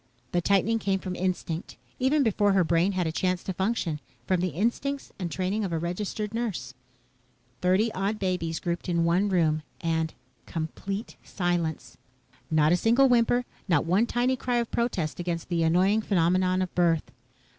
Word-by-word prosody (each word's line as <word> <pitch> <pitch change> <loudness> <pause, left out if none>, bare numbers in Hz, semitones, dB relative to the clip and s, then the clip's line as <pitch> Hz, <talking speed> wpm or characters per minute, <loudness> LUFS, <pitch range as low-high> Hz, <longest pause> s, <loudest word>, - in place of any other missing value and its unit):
The 175 - +1
tightening 200 +5 +2
came 195 -2 +1
from 185 -1 -5
instinct, 180 -2 -3 0.2
even 275 +3 +3
before 205 -3 +2
her 190 -2 +4
brain 170 +4 +2
had 185 -2 0
a 160 - 0
chance 180 +2 -1
to 190 - -3
function, 190 -5 -1 0.3
from 185 -2 +1
the 185 - +1
instincts 235 - -2
and 180 -2 -2
training 190 +6 -1
of 190 - -2
a 165 - 0
registered 200 +5 -3
nurse. 195 - -3 0.9
Thirty 195 +5 +2
odd 200 +2 -1
babies 180 -4 -1
grouped 175 +1 -3
in 170 -1 +2
one 180 +5 +2
room 160 -4 +2 0.2
and 160 -1 -1 0.3
complete 195 +6 -4
silence. 175 -4 -2 0.5
Not 155 -1 +3
a 175 - +4
single 240 +7 +4
whimper. 245 0 +3 0.2
Not 165 -6 +2
one 190 +8 +3
tiny 245 +2 +1
cry 250 -1 -2
of 235 -1 0
protest 185 -11 -1
against 170 -1 -3
the 170 -2 +1
annoying 185 +6 +3
phenomenon 185 -1 +2
of 185 - -6
birth. 170 -3 +1
185 Hz, 165 wpm, -27 LUFS, 170-210 Hz, 0.9 s, her